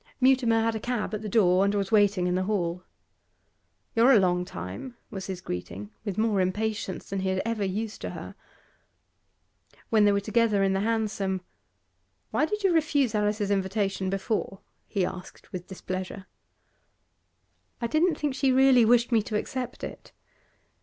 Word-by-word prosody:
Mutimer 250 -4 +4
had 225 0 +1
a 220 - -3
cab 240 -1 -2
at 215 - -3
the 215 - -5
door, 190 -3 +4
and 200 +1 +1
was 200 -1 -1
waiting 205 -4 +3
in 180 - +1
the 185 +1 0
hall. 180 -4 -1 1.1
'You're 240 +4 +6
a 225 - +7
long 180 -1 +1
time,' 95 - -7
was 190 -2 -6
his 185 -2 -5
greeting, 95 - -6
with 200 -3 -4
more 215 -3 +2
impatience 205 0 -2
than 195 - -3
he 190 0 -1
had 190 0 0
ever 230 -2 -1
used 210 +3 -3
to - - -4
her. - - -8 1.6
When 220 -2 +5
they 205 - +5
were 200 - +2
together 215 -1 +2
in 195 0 +2
the 195 - +1
hansom: 205 -3 -1 0.9
'Why - - +2
did 420 +5 -3
you 380 -3 +4
refuse 290 -7 +2
Alice's 210 -1 0
invitation 195 -1 0
before?' 195 0 -2 0.3
he 195 -4 0
asked 180 +1 -9
with 180 -1 -6
displeasure. 185 0 -6 1.5
'I 235 - -2
didn't 310 +7 +2
think 295 -2 -2
she 265 0 +2
really 260 -2 +6
wished 240 +2 +4
me 225 -2 +4
to 210 0 -2
accept 250 +2 -5
it. - - -8
210 Hz, 165 wpm, -27 LUFS, 190-230 Hz, 1.6 s, a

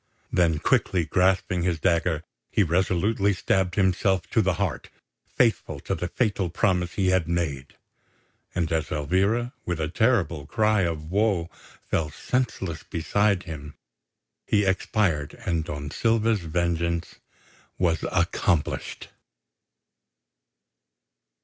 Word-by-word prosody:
Then 85 -3 +3
quickly 85 +3 +1
grasping 95 0 +2
his 85 -2 0
dagger 85 -1 +1 0.3
he 105 - +3
resolutely 95 +4 +1
stabbed 95 -1 0
himself 95 -1 +2
to 115 - +3
the 95 -3 +1
heart, - - -2 0.4
faithful - - +1
to - - -3
the 90 - -2
fatal 100 -3 0
promise 90 -1 0
he 95 -2 +1
had 95 -3 +2
made; 80 -6 -2 0.8
and 85 -3 0
as 80 -1 0
Elvira, 100 - +1
with 85 -2 -3
a 80 -1 -1
terrible 85 - +1
cry 110 0 +2
of 80 -2 -2
woe, 100 -4 +1 0.4
fell 80 -2 0
senseless 95 - -2
beside 100 +4 0
him, 75 -4 -8 0.7
he 105 -1 +3
expired 95 -5 0
and 80 -3 0
Don 75 -3 -5
Silva's 115 +1 +2
vengeance 85 0 -1 0.6
was 85 -4 +1
accomplished. 80 -5 0
90 Hz, 115 wpm, -25 LUFS, 80-100 Hz, 0.8 s, Then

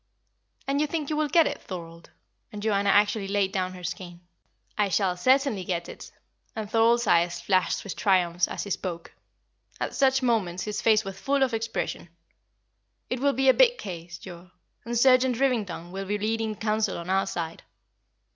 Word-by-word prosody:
"And 280 +1 +1
you 300 - +1
think 305 -1 -3
you - - 0
will 305 0 +1
get 330 +3 +5
it, - - -3
Thorold?" 170 -2 -9 0.4
and 210 - -7
Joanna 200 -2 +1
actually 205 0 +3
laid 200 -1 0
down 185 -2 -2
her 180 - -11
skein. 175 -1 -6 0.5
"I 205 -1 +1
shall 190 -1 +1
certainly 255 0 +2
get 175 -1 -3
it;" - - -10 0.4
and 220 -2 -4
Thorold's 230 +2 +3
eyes 170 0 +2
flashed 185 +1 +1
with 200 - -6
triumph 180 -4 +2
as - - -4
he 200 - -7
spoke; 175 -3 -4 0.7
at - - -3
such 265 -1 +2
moments 195 -8 0
his 210 -1 -3
face 220 -1 +4
was 195 0 -7
full 275 +3 +1
of 255 -3 0
expression. 225 -5 -3 1.0
"It 250 - -1
will 280 +1 +2
be 270 +2 +1
a 260 - +8
big - - +4
case, 175 - -7
Joa, 175 0 -11 0.4
and 235 0 -2
Sergeant 255 0 +4
Rivington 210 -10 -1
will 195 +1 -5
be 205 +2 -1
leading 220 +1 -1
counsel 215 0 -1
on 170 +2 -5
our 195 +1 +2
side." 165 -3 -4
205 Hz, 180 wpm, -26 LUFS, 180-240 Hz, 1.0 s, a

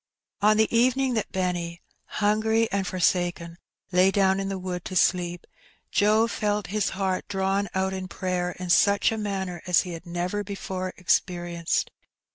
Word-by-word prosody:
On 215 +1 +5
the 220 +1 +2
evening 255 +2 +3
that 220 -3 -2
Benny, 175 -2 -2 0.3
hungry 220 +2 +1
and 195 -1 -1
forsaken, 175 -2 0 0.3
lay 180 +1 +5
down 195 -1 +2
in 195 0 -2
the 195 - -3
wood 180 -1 -5
to 185 - -5
sleep, 175 -1 +1 0.5
Joe 215 +2 +4
felt 210 -2 -1
his 210 -2 +1
heart 190 -2 -1
drawn 195 0 0
out 190 0 0
in 190 -1 -4
prayer 180 0 -2
in 180 -1 -3
such 200 +3 +4
a - - -1
manner 190 -4 -3
as 180 - +4
he 180 - -7
had 170 +1 -8
never 180 +4 -2
before 190 -2 -4
experienced. 175 -2 0
190 Hz, 160 wpm, -26 LUFS, 180-205 Hz, 0.5 s, On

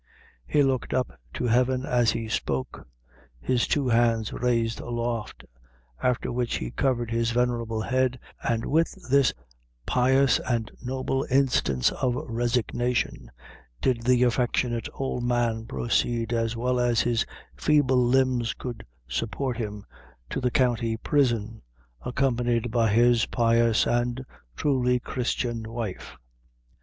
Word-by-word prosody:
He 145 - +3
looked 135 -3 0
up 130 - 0 0.2
to - - -2
heaven 125 +2 +2
as 120 -3 +2
he 115 +1 -2
spoke, 65 -10 -3 0.5
his 125 - 0
two 140 -3 +1
hands 115 -2 +2
raised 115 -2 0
aloft; 120 -2 -4 0.6
after 125 -1 0
which 120 0 -1
he 60 - -5
covered 120 -4 0
his 115 0 +1
venerable 115 -2 0
head, 130 +1 +1 0.2
and, 115 -1 -1
with 165 +3 +1 0.2
this 140 -2 +5 0.5
pious 130 +1 +3
and 115 -3 -2
noble 130 +1 -2
instance 125 - +2
of 125 -2 -1
resignation, 120 - -1 0.5
did 120 - +1
the 125 +1 +3
affectionate 120 -1 0
old 130 -2 -3
man 120 -2 0
proceed, 120 -1 0
as 115 0 -1
well 125 +1 0
as 120 -2 +2
his 120 +2 +1 0.3
feeble 135 -4 +3
limbs 125 -1 +2
could 120 -3 -7 0.2
support 115 - -2
him, 105 -3 -5 0.5
to - - -2
the 125 - +2
county 120 -3 +1
prison, 115 -4 0 0.4
accompanied 120 -3 0
by 115 -1 +2
his 120 +2 +4
pious 115 -1 +3
and 120 +2 0 0.3
truly 125 - +1
Christian 120 -2 -2
wife. 115 -5 -5
120 Hz, 125 wpm, -26 LUFS, 115-125 Hz, 0.6 s, this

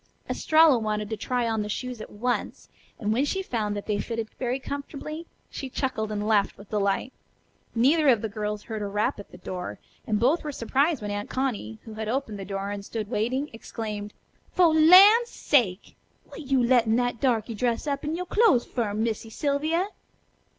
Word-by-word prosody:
Estralla 315 -5 +4
wanted 210 -1 -2
to - - 0
try 245 +2 -1
on 220 -1 0
the 210 - -4
shoes 250 +1 -4
at - - -8
once, 245 +4 -3 0.3
and 215 -1 -1
when 250 +5 +2
she 385 +7 -1
found 215 - -2
that 205 - -6
they 210 -2 -1
fitted 225 +1 -4
very 250 0 -1
comfortably, 290 +4 -6 0.2
she 270 - -6
chuckled 235 -5 -2
and 210 0 -2
laughed 205 -2 +2
with 200 0 -14
delight. 205 +4 0 0.6
Neither 290 +7 +4
of 230 -4 +3
the - - 0
girls 210 0 -4
heard 220 -2 -5
a 205 - -2
rap 205 +1 -1
at 200 - -10
the - - -11
door, 180 0 -6 0.3
and 210 -1 +1
both 270 +9 +2
were 300 - -3
surprised 275 +2 0
when 205 - -3
Aunt 205 0 -4
Connie, 225 - -2
who 220 - -9
had 215 0 -4
opened 230 -5 -2
the 195 - -6
door 195 +1 -4
and 200 -1 -5
stood 215 +1 -5
waiting, 255 +7 -1
exclaimed: 210 -2 -6 0.4
"Fo' 355 -2 +6
lan's 380 +9 +8
sake! 210 -10 +1 0.4
Wat - - -9
you 265 -2 +3
lettin' 235 -2 +4
that 245 -1 0
darky 230 -3 +1
dress 235 +3 -1
up 280 -2 -2
in 305 +2 -2
you' 360 +1 -3
clo'es 390 - +3
fer, 220 -5 -2
Missy 220 0 -2
Sylvia?" 305 - 0
230 Hz, 190 wpm, -26 LUFS, 210-280 Hz, 0.6 s, lan's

